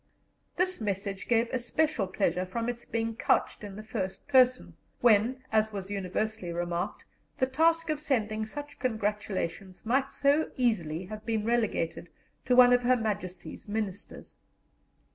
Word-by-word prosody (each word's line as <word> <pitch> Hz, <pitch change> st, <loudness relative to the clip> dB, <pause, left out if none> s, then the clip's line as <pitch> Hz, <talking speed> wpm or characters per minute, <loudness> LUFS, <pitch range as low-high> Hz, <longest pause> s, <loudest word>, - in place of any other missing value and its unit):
This 370 Hz, -5 st, 0 dB
message 195 Hz, -2 st, -3 dB
gave 235 Hz, 0 st, +3 dB
especial 255 Hz, -2 st, 0 dB
pleasure 185 Hz, -2 st, 0 dB
from 230 Hz, +6 st, -3 dB
its 240 Hz, -1 st, -4 dB
being 225 Hz, 0 st, -2 dB
couched 220 Hz, -, +1 dB
in 200 Hz, -2 st, -7 dB
the 215 Hz, -, -8 dB
first 200 Hz, -4 st, -4 dB
person, 255 Hz, -2 st, +4 dB, 0.3 s
when, 240 Hz, +3 st, +4 dB
as 220 Hz, 0 st, +2 dB
was 200 Hz, -1 st, -5 dB
universally 200 Hz, 0 st, -2 dB
remarked, 175 Hz, +3 st, -3 dB, 0.3 s
the 260 Hz, -, +3 dB
task 325 Hz, +4 st, +2 dB
of 305 Hz, -, -2 dB
sending 220 Hz, -8 st, -1 dB
such 290 Hz, +4 st, -8 dB
congratulations 210 Hz, -5 st, -3 dB
might 265 Hz, +4 st, +1 dB
so 285 Hz, +2 st, +2 dB
easily 185 Hz, -9 st, 0 dB
have 215 Hz, +2 st, -8 dB
been 220 Hz, -2 st, -1 dB
relegated 220 Hz, -8 st, 0 dB, 0.4 s
to 250 Hz, -, +3 dB
one 250 Hz, 0 st, +8 dB
of 245 Hz, -, +4 dB
Her 250 Hz, +1 st, +3 dB
Majesty's 205 Hz, -6 st, -4 dB
Ministers. 205 Hz, -2 st, -5 dB
220 Hz, 145 wpm, -29 LUFS, 195-250 Hz, 0.4 s, one